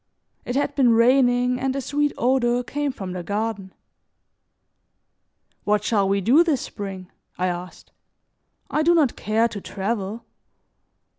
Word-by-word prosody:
It 245 Hz, -, -3 dB
had 285 Hz, 0 st, 0 dB
been 260 Hz, -4 st, +4 dB
raining 245 Hz, +1 st, +3 dB
and 265 Hz, 0 st, -1 dB
a -, -, -1 dB
sweet 290 Hz, +2 st, 0 dB
odor 245 Hz, 0 st, +1 dB
came 290 Hz, +2 st, -2 dB
from 195 Hz, -8 st, -7 dB
the 180 Hz, 0 st, -5 dB
garden. 205 Hz, 0 st, -3 dB, 1.9 s
"What 210 Hz, 0 st, +1 dB
shall 200 Hz, -3 st, +1 dB
we 200 Hz, 0 st, +1 dB
do 265 Hz, -, +5 dB
this 310 Hz, -7 st, 0 dB
spring?" 195 Hz, -3 st, -7 dB, 0.3 s
I 180 Hz, -, 0 dB
asked. 180 Hz, 0 st, -6 dB, 0.8 s
"I 305 Hz, -, +1 dB
do 340 Hz, +2 st, +4 dB
not 295 Hz, -7 st, +2 dB
care 220 Hz, +2 st, +1 dB
to 205 Hz, -3 st, -7 dB
travel." 205 Hz, +3 st, -4 dB
235 Hz, 140 wpm, -23 LUFS, 200-265 Hz, 1.9 s, do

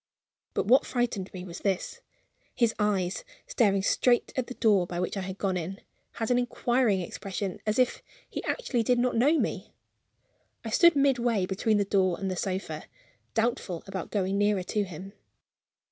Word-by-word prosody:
But -, -, +1 dB
what 250 Hz, +6 st, +5 dB
frightened 235 Hz, -6 st, -2 dB
me 180 Hz, -1 st, -7 dB
was 175 Hz, -1 st, -8 dB
this. 195 Hz, -2 st, -2 dB, 0.5 s
His 235 Hz, -2 st, +2 dB
eyes, 195 Hz, -, 0 dB, 0.2 s
staring 200 Hz, -5 st, +2 dB
straight 240 Hz, +4 st, +2 dB
at 255 Hz, -2 st, -1 dB
the 255 Hz, -, -7 dB
door 200 Hz, -6 st, +3 dB
by 175 Hz, 0 st, -4 dB
which 180 Hz, -, -2 dB
I 195 Hz, -, -2 dB
had 190 Hz, 0 st, -5 dB
gone 190 Hz, -2 st, 0 dB
in, 180 Hz, +3 st, -5 dB, 0.3 s
had 225 Hz, +1 st, -2 dB
an 245 Hz, -, +4 dB
inquiring 240 Hz, -4 st, +1 dB
expression, 190 Hz, +1 st, -5 dB
as 215 Hz, -, +1 dB
if 255 Hz, -1 st, +2 dB, 0.3 s
he -, -, -5 dB
actually 275 Hz, -, 0 dB
did 245 Hz, +2 st, +2 dB
not 245 Hz, 0 st, +1 dB
know 285 Hz, +8 st, +4 dB
me! -, -, -3 dB, 0.9 s
I -, -, -4 dB
stood 340 Hz, -3 st, +6 dB
midway 245 Hz, -7 st, +2 dB
between 205 Hz, +3 st, +1 dB
the 205 Hz, -, +1 dB
door 190 Hz, -3 st, +2 dB
and 195 Hz, -1 st, -2 dB
the -, -, -2 dB
sofa, 190 Hz, +1 st, -3 dB, 0.5 s
doubtful 225 Hz, -7 st, -1 dB
about 190 Hz, -3 st, -5 dB
going 195 Hz, -1 st, 0 dB
nearer 205 Hz, -2 st, +2 dB
to 205 Hz, +3 st, -1 dB
him. 190 Hz, +2 st, -9 dB
205 Hz, 175 wpm, -28 LUFS, 190-240 Hz, 0.9 s, stood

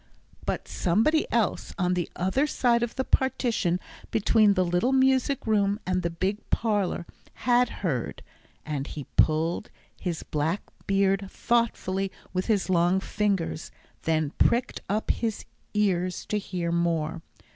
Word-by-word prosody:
But -, -, -2 dB
somebody 225 Hz, -, +2 dB
else, 230 Hz, -5 st, 0 dB
on 180 Hz, -2 st, +1 dB
the 180 Hz, -2 st, -1 dB
other 190 Hz, +12 st, +1 dB
side 240 Hz, -5 st, +2 dB
of 240 Hz, -1 st, -2 dB
the 260 Hz, -, 0 dB
partition 235 Hz, -10 st, +1 dB, 0.3 s
between 215 Hz, -1 st, +4 dB
the 185 Hz, -1 st, +3 dB
little 175 Hz, +9 st, +1 dB
music 265 Hz, +1 st, +3 dB
room 205 Hz, -2 st, +2 dB
and 185 Hz, 0 st, 0 dB
the 170 Hz, -, -1 dB
big 190 Hz, +5 st, -1 dB
parlour, 205 Hz, -6 st, 0 dB, 0.4 s
had 245 Hz, 0 st, +4 dB
heard, 150 Hz, -, -3 dB, 0.4 s
and 145 Hz, -2 st, -3 dB
he 150 Hz, -, -6 dB
pulled 160 Hz, +5 st, +2 dB, 0.3 s
his 175 Hz, -3 st, -3 dB
black 155 Hz, +6 st, -1 dB, 0.2 s
beard 195 Hz, 0 st, +2 dB
thoughtfully 195 Hz, -6 st, 0 dB, 0.2 s
with 185 Hz, 0 st, -1 dB
his 210 Hz, -4 st, +2 dB
long 180 Hz, 0 st, +3 dB
fingers, 195 Hz, -5 st, -1 dB, 0.3 s
then 155 Hz, -2 st, +1 dB
pricked 240 Hz, +2 st, +2 dB
up 210 Hz, +2 st, +1 dB
his 225 Hz, -3 st, -2 dB, 0.3 s
ears 185 Hz, -3 st, +1 dB
to 210 Hz, -, -1 dB
hear 175 Hz, -4 st, -3 dB
more. 170 Hz, -1 st, 0 dB
195 Hz, 135 wpm, -27 LUFS, 175-225 Hz, 0.4 s, between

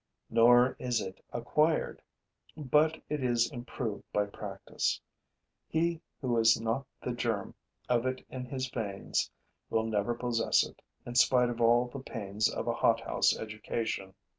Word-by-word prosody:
Nor 120 Hz, +2 st, +6 dB
is 125 Hz, -2 st, 0 dB
it 95 Hz, 0 st, -7 dB
acquired; 150 Hz, +7 st, +1 dB, 0.6 s
but 155 Hz, +2 st, +2 dB
it 150 Hz, -3 st, -2 dB
is 120 Hz, +1 st, +2 dB
improved 120 Hz, -4 st, -5 dB
by 105 Hz, 0 st, +2 dB
practice. 100 Hz, -, -3 dB, 0.7 s
He 165 Hz, 0 st, 0 dB, 0.2 s
who 125 Hz, -3 st, 0 dB
has 115 Hz, 0 st, +5 dB
not 115 Hz, +4 st, -1 dB, 0.2 s
the 125 Hz, -, -2 dB
germ 115 Hz, -4 st, -2 dB, 0.3 s
of 120 Hz, 0 st, +2 dB
it 130 Hz, 0 st, -3 dB
in 130 Hz, -1 st, -6 dB
his 130 Hz, 0 st, -3 dB
veins 105 Hz, -6 st, -2 dB, 0.4 s
will 110 Hz, -, +1 dB
never 110 Hz, +1 st, 0 dB
possess 120 Hz, -1 st, +2 dB
it, -, -, -13 dB, 0.2 s
in 120 Hz, -, -6 dB
spite 125 Hz, 0 st, +5 dB
of 120 Hz, 0 st, -5 dB
all 120 Hz, +1 st, +5 dB
the 125 Hz, +3 st, -7 dB
pains 110 Hz, -4 st, -1 dB
of -, -, -4 dB
a -, -, +2 dB
hothouse -, -, +2 dB
education. 105 Hz, -3 st, -4 dB
120 Hz, 145 wpm, -31 LUFS, 115-130 Hz, 0.7 s, Nor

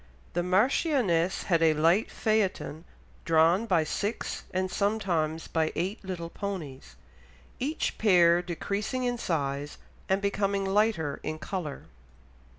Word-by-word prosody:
The 175 Hz, -, +1 dB
marchioness 190 Hz, -, +2 dB
had 170 Hz, -4 st, +2 dB
a 160 Hz, -1 st, +4 dB
light 165 Hz, +7 st, +3 dB
phaeton 195 Hz, -7 st, -1 dB, 0.4 s
drawn 165 Hz, +6 st, +3 dB
by 175 Hz, -6 st, +3 dB
six, 205 Hz, +8 st, -3 dB
and 185 Hz, 0 st, -1 dB
sometimes 175 Hz, -7 st, 0 dB
by 160 Hz, -1 st, 0 dB
eight 190 Hz, +7 st, -2 dB
little 175 Hz, -3 st, -5 dB
ponies, 155 Hz, -, -6 dB, 0.6 s
each 295 Hz, +5 st, -2 dB
pair 175 Hz, -5 st, +5 dB
decreasing 200 Hz, +8 st, -3 dB
in 245 Hz, -1 st, -1 dB
size 145 Hz, -5 st, -2 dB, 0.3 s
and 190 Hz, +1 st, +3 dB
becoming 200 Hz, 0 st, 0 dB
lighter 195 Hz, -7 st, +1 dB
in 155 Hz, -, -4 dB
colour.... 160 Hz, -4 st, -5 dB
185 Hz, 120 wpm, -28 LUFS, 165-205 Hz, 0.6 s, pair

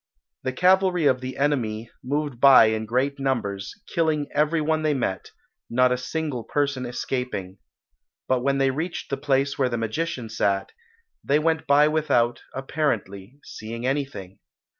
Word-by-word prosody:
The 130 Hz, -, -2 dB
cavalry 180 Hz, +1 st, +3 dB
of 130 Hz, -2 st, +3 dB
the 130 Hz, 0 st, -6 dB
enemy 120 Hz, -6 st, -1 dB
moved 145 Hz, -1 st, -2 dB
by 135 Hz, -2 st, +8 dB
in 110 Hz, 0 st, -3 dB
great 135 Hz, +5 st, 0 dB
numbers, 105 Hz, -8 st, -2 dB
killing 160 Hz, -4 st, 0 dB
every 150 Hz, +3 st, +2 dB
one 155 Hz, +1 st, 0 dB
they 155 Hz, -2 st, +1 dB
met, 95 Hz, -7 st, -2 dB, 0.4 s
not 125 Hz, +1 st, +3 dB
a -, -, +3 dB
single 135 Hz, -2 st, -3 dB
person 140 Hz, -2 st, -1 dB
escaping; 120 Hz, -6 st, -4 dB, 0.7 s
but 130 Hz, -1 st, +1 dB
when 140 Hz, +1 st, +1 dB
they 135 Hz, -1 st, +2 dB
reached 160 Hz, +5 st, -4 dB
the 140 Hz, -, 0 dB
place 140 Hz, 0 st, 0 dB
where 130 Hz, -2 st, +2 dB
the 120 Hz, -, -2 dB
magician 115 Hz, +2 st, -3 dB
sat, 100 Hz, -3 st, -1 dB, 0.5 s
they 140 Hz, -, +2 dB
went 160 Hz, 0 st, 0 dB
by 145 Hz, +1 st, +5 dB
without, 140 Hz, -7 st, +1 dB
apparently, 130 Hz, -6 st, -3 dB
seeing 115 Hz, +2 st, -7 dB
anything. 130 Hz, -9 st, -3 dB
135 Hz, 150 wpm, -24 LUFS, 120-150 Hz, 0.7 s, by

